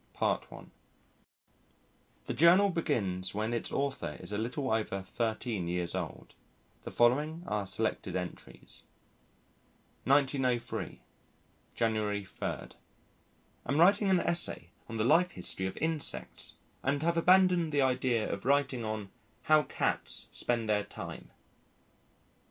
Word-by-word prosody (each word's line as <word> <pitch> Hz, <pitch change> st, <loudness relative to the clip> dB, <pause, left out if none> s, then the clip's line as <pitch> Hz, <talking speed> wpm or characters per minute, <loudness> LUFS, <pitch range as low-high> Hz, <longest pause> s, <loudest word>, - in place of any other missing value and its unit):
PART -, -, 0 dB
I -, -, -10 dB, 1.6 s
THE -, -, -2 dB
JOURNAL 180 Hz, +5 st, +6 dB
BEGINS 95 Hz, -, -1 dB
WHEN 110 Hz, +2 st, -1 dB
ITS 115 Hz, -, -3 dB
AUTHOR 135 Hz, -, -2 dB
IS -, -, -8 dB
A 105 Hz, -, -1 dB
LITTLE 125 Hz, +3 st, -2 dB
OVER 100 Hz, -3 st, -1 dB
13 110 Hz, -3 st, -2 dB
YEARS 90 Hz, 0 st, -1 dB
OLD. -, -, -5 dB, 0.5 s
[The -, -, -7 dB
Following 150 Hz, +8 st, +2 dB
are 105 Hz, -, -2 dB
Selected 95 Hz, -, -1 dB
Entries.] 90 Hz, -1 st, -6 dB, 1.2 s
1903 130 Hz, -3 st, +1 dB, 0.7 s
January 105 Hz, -3 st, 0 dB
3. -, -, -4 dB, 1.1 s
Am 140 Hz, +5 st, +1 dB
writing 195 Hz, +3 st, +5 dB
an 185 Hz, -2 st, +4 dB
essay 170 Hz, -, -2 dB, 0.2 s
on 115 Hz, -, -4 dB
the 110 Hz, -, +1 dB
life 170 Hz, +7 st, +5 dB
history 95 Hz, +1 st, -1 dB
of 95 Hz, -, -6 dB
insects 160 Hz, -1 st, -2 dB, 0.3 s
and 140 Hz, +3 st, 0 dB
have 170 Hz, +1 st, +2 dB
abandoned 180 Hz, -1 st, +4 dB
the 145 Hz, -2 st, +3 dB
idea 125 Hz, -3 st, +1 dB
of 100 Hz, -, -4 dB
writing 135 Hz, -2 st, +2 dB
on 110 Hz, -2 st, -4 dB, 0.3 s
"How 155 Hz, +2 st, +5 dB
Cats -, -, -1 dB
Spend 115 Hz, -2 st, -1 dB
their 105 Hz, -1 st, +2 dB
Time." -, -, -8 dB
120 Hz, 125 wpm, -31 LUFS, 105-155 Hz, 1.6 s, JOURNAL